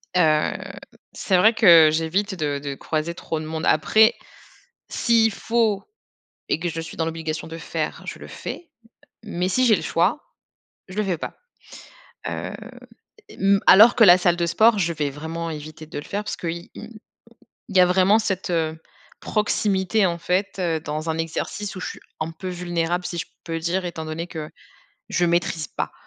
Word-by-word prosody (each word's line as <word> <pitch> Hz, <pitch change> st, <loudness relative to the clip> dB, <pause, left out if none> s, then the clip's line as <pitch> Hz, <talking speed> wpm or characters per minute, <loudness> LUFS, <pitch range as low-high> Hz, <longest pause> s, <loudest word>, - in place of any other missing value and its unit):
heu, 155 Hz, -4 st, +3 dB, 0.6 s
c'est 190 Hz, -, +1 dB
vrai 220 Hz, +5 st, +5 dB
que 170 Hz, -8 st, +7 dB
j'évite 170 Hz, +6 st, -1 dB
de 145 Hz, -4 st, -2 dB
de 140 Hz, -1 st, -5 dB
croiser 155 Hz, +3 st, -3 dB
trop 160 Hz, -1 st, -4 dB
de 155 Hz, -, -6 dB
monde. 160 Hz, +1 st, -4 dB
Après, 220 Hz, +1 st, +4 dB, 0.7 s
s'il 230 Hz, -2 st, +2 dB
faut 220 Hz, -1 st, 0 dB, 0.7 s
et -, -, +1 dB
que 175 Hz, -, -2 dB
je 165 Hz, 0 st, -4 dB
suis 165 Hz, -, -9 dB
dans 160 Hz, -, 0 dB
l'obligation 160 Hz, -1 st, -4 dB
de 165 Hz, 0 st, -8 dB
faire, -, -, -4 dB
je -, -, -7 dB
le -, -, -10 dB
fais, 345 Hz, -, -8 dB, 0.5 s
mais 180 Hz, -4 st, -2 dB
si 255 Hz, +7 st, +2 dB
j'ai 225 Hz, -3 st, +5 dB
le -, -, -4 dB
choix, 175 Hz, -, +1 dB, 0.7 s
je 185 Hz, -, -10 dB
le 215 Hz, -, +1 dB
fais 180 Hz, -4 st, -1 dB
pas. -, -, -6 dB, 0.9 s
Hem, -, -, -4 dB, 0.7 s
et -, -, -12 dB
m 195 Hz, 0 st, +3 dB
alors 220 Hz, +5 st, +8 dB
que 230 Hz, -, +5 dB
la 180 Hz, -3 st, +9 dB
salle 175 Hz, -1 st, +2 dB
de 170 Hz, -, 0 dB
sport, 215 Hz, +5 st, +4 dB
je 170 Hz, -2 st, 0 dB
vais 150 Hz, -2 st, -1 dB
vraiment 160 Hz, +4 st, -5 dB
éviter 155 Hz, 0 st, -8 dB
de 155 Hz, -, -8 dB
le 145 Hz, -, -9 dB
faire 205 Hz, +1 st, -3 dB
parce 210 Hz, -, -5 dB
qu'il 170 Hz, 0 st, -5 dB
il 220 Hz, 0 st, -10 dB, 0.7 s
il 195 Hz, -, -4 dB
y -, -, +8 dB
a 180 Hz, -, +7 dB
vraiment 190 Hz, +4 st, +4 dB
cette, 190 Hz, -4 st, -2 dB
heu, 160 Hz, -2 st, -1 dB, 0.4 s
proximité 205 Hz, -1 st, +1 dB
en 170 Hz, -1 st, -1 dB
fait, 185 Hz, +3 st, -1 dB
heu, 170 Hz, -3 st, 0 dB
dans 155 Hz, +1 st, -4 dB
un 160 Hz, -, -2 dB
exercice 190 Hz, +5 st, -4 dB
où -, -, -6 dB
je -, -, -4 dB
suis -, -, -10 dB, 0.2 s
un 155 Hz, +1 st, -2 dB
peu 185 Hz, +3 st, -7 dB
vulnérable, 175 Hz, 0 st, -2 dB
si 170 Hz, -, -5 dB
je -, -, -3 dB, 0.2 s
peux 165 Hz, -1 st, -3 dB
dire, 175 Hz, +3 st, -1 dB
étant 170 Hz, -2 st, -5 dB
donné 160 Hz, +2 st, -4 dB
que 155 Hz, -3 st, -7 dB, 0.6 s
je 175 Hz, -, +1 dB
maîtrise 170 Hz, -3 st, 0 dB
pas. -, -, -4 dB
175 Hz, 190 wpm, -23 LUFS, 160-195 Hz, 0.9 s, la